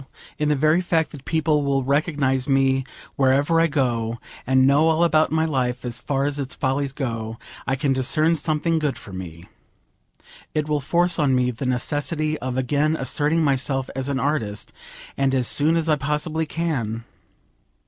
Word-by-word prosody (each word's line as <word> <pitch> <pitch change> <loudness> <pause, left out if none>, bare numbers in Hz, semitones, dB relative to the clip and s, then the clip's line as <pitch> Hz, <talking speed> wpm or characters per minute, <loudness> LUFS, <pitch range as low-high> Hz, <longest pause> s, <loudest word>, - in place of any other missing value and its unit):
Still, 135 - -17 0.3
in 150 0 +1
the 150 - +3
very 155 +5 +3
fact 165 -3 0
that 140 -3 -11
people 155 -2 +1
will 135 -1 0
recognise 140 -2 0
me 135 -1 +2 0.3
wherever 140 +5 +3
I 165 - +4
go, 120 -6 -1 0.3
and 130 0 +4
know 145 +4 +4
all 160 +1 +3
about 155 -2 +3
my 160 0 +1
life, 125 -5 -2
as 120 0 -5
far 140 -1 -1
as 145 0 -1
its 135 -1 -4
follies 140 0 -1
go, 115 -5 -4 0.3
I 135 - +1
can 135 0 0
discern 155 +5 +2
something 160 +1 0
good 145 -4 -1
for 100 - -12
me. 85 -3 -8 1.1
It 155 -1 0
will 150 -1 0
force 175 +4 +1
on 140 -3 +3
me 125 0 +1
the 125 +2 -5
necessity 150 +4 -1
of 130 0 -4
again 145 +4 +1
asserting 150 +3 +1
myself 135 -2 0
as 135 +1 -3
an 135 -2 -1
artist, 125 -7 -2 0.4
and 135 -1 +1
as 125 -2 +2
soon 155 +3 +5
as 165 -1 -1
I 155 -2 +3
possibly 150 +3 -1
can. 125 -10 -3
140 Hz, 180 wpm, -22 LUFS, 130-155 Hz, 1.1 s, soon